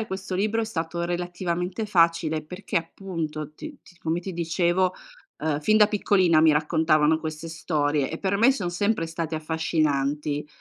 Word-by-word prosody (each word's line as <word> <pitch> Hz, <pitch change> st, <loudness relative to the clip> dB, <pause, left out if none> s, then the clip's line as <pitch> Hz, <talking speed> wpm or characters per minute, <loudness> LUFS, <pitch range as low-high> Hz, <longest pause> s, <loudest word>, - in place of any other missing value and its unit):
scrivere 220 Hz, -, -3 dB
questo 190 Hz, -1 st, -5 dB
libro 215 Hz, +4 st, +1 dB
è -, -, 0 dB
stato 170 Hz, -4 st, -3 dB
relativamente 175 Hz, +2 st, -2 dB
facile, 165 Hz, -4 st, +2 dB
perché 180 Hz, +6 st, -5 dB
appunto, 165 Hz, -3 st, -4 dB
ti 310 Hz, -, -9 dB
ti 175 Hz, -, -19 dB
come 165 Hz, +2 st, -1 dB
ti 190 Hz, +1 st, -6 dB
dicevo, 175 Hz, +2 st, +1 dB, 0.4 s
ehm, 150 Hz, -1 st, -1 dB
fin 215 Hz, +8 st, +3 dB
da 210 Hz, -1 st, +7 dB
piccolina 185 Hz, -6 st, +3 dB
mi 155 Hz, -1 st, +6 dB
raccontavano 155 Hz, 0 st, +3 dB
queste 160 Hz, +1 st, -6 dB
storie, 150 Hz, -3 st, 0 dB
e 160 Hz, -, -5 dB
per 195 Hz, 0 st, 0 dB
me 230 Hz, +6 st, +5 dB
son 185 Hz, -9 st, -3 dB
sempre 200 Hz, -1 st, 0 dB
state 165 Hz, -1 st, -4 dB
affascinanti. 150 Hz, -2 st, -1 dB
165 Hz, 165 wpm, -25 LUFS, 155-185 Hz, 0.4 s, da